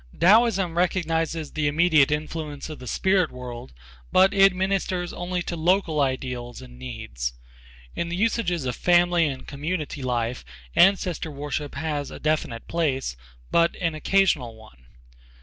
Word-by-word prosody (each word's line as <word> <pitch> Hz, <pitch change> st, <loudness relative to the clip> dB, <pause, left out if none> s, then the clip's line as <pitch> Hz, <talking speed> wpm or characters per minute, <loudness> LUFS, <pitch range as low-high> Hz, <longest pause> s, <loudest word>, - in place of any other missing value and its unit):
Taoism 195 Hz, -3 st, +4 dB
recognizes 165 Hz, -3 st, 0 dB
the 150 Hz, -1 st, -1 dB
immediate 155 Hz, -1 st, +4 dB
influence 150 Hz, 0 st, -4 dB
of 155 Hz, -, -8 dB
the 125 Hz, -, -9 dB
spirit 190 Hz, +4 st, +2 dB
world, 120 Hz, -, -8 dB, 0.4 s
but 190 Hz, +1 st, +5 dB
it 195 Hz, 0 st, +6 dB
ministers 185 Hz, -1 st, -1 dB
only 175 Hz, 0 st, -3 dB
to 170 Hz, -, -4 dB
local 165 Hz, -2 st, +1 dB
ideals 125 Hz, -3 st, -3 dB
and 60 Hz, -1 st, -13 dB
needs. -, -, -5 dB, 0.6 s
In 170 Hz, -, -2 dB
the 170 Hz, -, -3 dB
usages 180 Hz, -, 0 dB
of 125 Hz, -2 st, -2 dB
family 175 Hz, -1 st, +3 dB
and 135 Hz, -2 st, -5 dB
community 150 Hz, 0 st, -4 dB
life, 120 Hz, -1 st, -2 dB, 0.3 s
ancestor 180 Hz, -3 st, +3 dB
worship 145 Hz, 0 st, -4 dB
has 145 Hz, -1 st, -3 dB
a -, -, -9 dB
definite 150 Hz, -7 st, -1 dB
place, 140 Hz, -, -1 dB, 0.4 s
but 170 Hz, 0 st, +3 dB
an 165 Hz, -4 st, 0 dB
occasional 155 Hz, -7 st, +1 dB
one. 110 Hz, -, -18 dB
155 Hz, 140 wpm, -24 LUFS, 130-175 Hz, 0.6 s, it